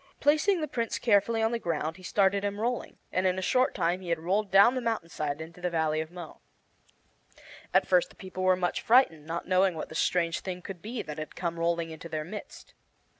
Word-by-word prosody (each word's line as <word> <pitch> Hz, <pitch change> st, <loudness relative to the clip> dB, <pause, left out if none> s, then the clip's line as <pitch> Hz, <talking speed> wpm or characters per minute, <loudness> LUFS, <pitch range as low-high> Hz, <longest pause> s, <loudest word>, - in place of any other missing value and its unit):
Placing 315 Hz, +6 st, +3 dB
the 305 Hz, -, -1 dB
Prince 235 Hz, -5 st, -2 dB
carefully 225 Hz, 0 st, +2 dB
on 225 Hz, -, +2 dB
the 235 Hz, -, -1 dB
ground 160 Hz, -3 st, -2 dB
he -, -, -14 dB
started 195 Hz, +1 st, +2 dB
him 205 Hz, 0 st, -2 dB
rolling, 240 Hz, +2 st, -2 dB
and 185 Hz, +1 st, +1 dB
in 185 Hz, 0 st, +1 dB
a -, -, -1 dB
short 255 Hz, +7 st, +2 dB
time 175 Hz, +3 st, 0 dB
he 180 Hz, -, -7 dB
had 170 Hz, -, +1 dB
rolled 195 Hz, +6 st, 0 dB
down 200 Hz, +6 st, +6 dB
the 255 Hz, -, -2 dB
mountain 225 Hz, -8 st, -2 dB
side 150 Hz, -2 st, -3 dB
into 165 Hz, +2 st, -9 dB
the 180 Hz, -, 0 dB
Valley 160 Hz, -2 st, 0 dB
of 160 Hz, -, -6 dB
Mo. 175 Hz, -2 st, -10 dB, 1.3 s
At -, -, +4 dB
first -, -, +3 dB
the -, -, -18 dB
people 185 Hz, -1 st, -7 dB
were 185 Hz, 0 st, +4 dB
much 180 Hz, -1 st, -1 dB
frightened, 195 Hz, -, +3 dB
not 170 Hz, +1 st, -4 dB
knowing 185 Hz, -1 st, +3 dB
what 155 Hz, -, -5 dB
this 160 Hz, -, -3 dB
strange 170 Hz, -2 st, +1 dB
thing 180 Hz, -1 st, -6 dB
could 190 Hz, -4 st, -8 dB
be 225 Hz, +2 st, -4 dB
that 150 Hz, 0 st, -7 dB
had 155 Hz, -, -7 dB
come 170 Hz, -2 st, -3 dB
rolling 170 Hz, -1 st, 0 dB
into 160 Hz, +1 st, -9 dB
their 155 Hz, -1 st, -3 dB
midst. 205 Hz, +6 st, -9 dB
185 Hz, 225 wpm, -28 LUFS, 165-220 Hz, 1.3 s, down